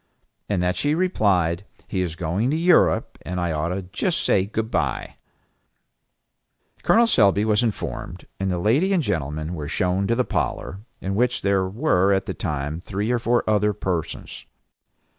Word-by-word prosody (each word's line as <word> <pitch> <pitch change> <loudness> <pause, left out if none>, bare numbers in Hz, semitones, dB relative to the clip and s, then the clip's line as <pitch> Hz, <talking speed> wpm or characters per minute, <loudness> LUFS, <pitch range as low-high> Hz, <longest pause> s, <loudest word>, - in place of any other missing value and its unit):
and 95 -4 0
that 90 0 +1
she 145 +1 +1
replied, 100 - +1 0.2
"He 95 - -1
is 85 -3 -3
going 90 +8 -1
to 150 - +1
Europe, 170 +1 +3
and 90 +1 -4
I 85 -1 0
ought 75 +1 -1
to 95 +2 -3
just 105 - -1
say 95 0 +2
good 110 +1 -3
by." - - -2 1.6
Col. 235 +1 +5
Selby 105 - +4
was 105 0 +3
informed; 115 -4 -4
and 95 0 -1
the 90 - 0
lady 135 - +2
and 175 -4 +2
gentleman 80 - -2
were 75 -4 -5
shown 90 +4 0
to 115 - +2
the 125 +1 +1
parlor, 95 - -2 0.2
in 95 - -2
which 125 +4 +1
were 100 - +2
at 95 - 0
the - - -3
time 75 +2 -3
three 105 +4 -2
or 120 - +1
four 120 +1 +1
other 105 -1 +2
persons. 90 -5 -4
100 Hz, 165 wpm, -23 LUFS, 90-115 Hz, 1.6 s, Col